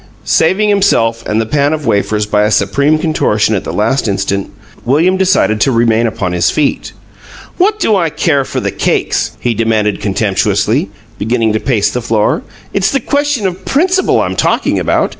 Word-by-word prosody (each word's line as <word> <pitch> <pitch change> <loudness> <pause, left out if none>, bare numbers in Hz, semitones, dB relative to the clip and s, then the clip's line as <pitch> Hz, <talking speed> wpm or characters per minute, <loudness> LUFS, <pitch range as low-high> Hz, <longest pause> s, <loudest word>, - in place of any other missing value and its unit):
Saving 190 +6 +2
himself 115 - +1
and 105 - 0
the 115 - 0
pan 145 +4 +1
of 155 -2 -4
wafers 105 -1 0
by 105 0 +1
a 105 - +2
supreme 125 +9 +1
contortion 110 -9 0
at 100 - -1
the - - -4
last 115 +4 0
instant, 100 -1 -2 0.3
William 160 +9 +2
decided 185 - +1
to 135 - +3
remain 115 -1 +2
upon 95 -4 -3
his 90 - +1
feet. 150 -2 -1 0.7
"What 410 +4 +2
do 220 - +2
I 170 -4 +1
care 150 -2 0
for - - -4
the - - -2
cakes?" - - -1
he 120 - -1
demanded, 110 -2 0
contemptuously, 100 +2 0 0.3
beginning 115 0 0
to 110 - 0
pace 115 -5 0
the 125 - -3
floor. 110 -2 0 0.3
"It's 195 -1 +1
the 275 - +1
question 285 -7 -1
of 185 0 -3
principle 365 - +1
I'm - - -2
talking - - 0
about! - - 0
120 Hz, 180 wpm, -13 LUFS, 105-175 Hz, 0.7 s, to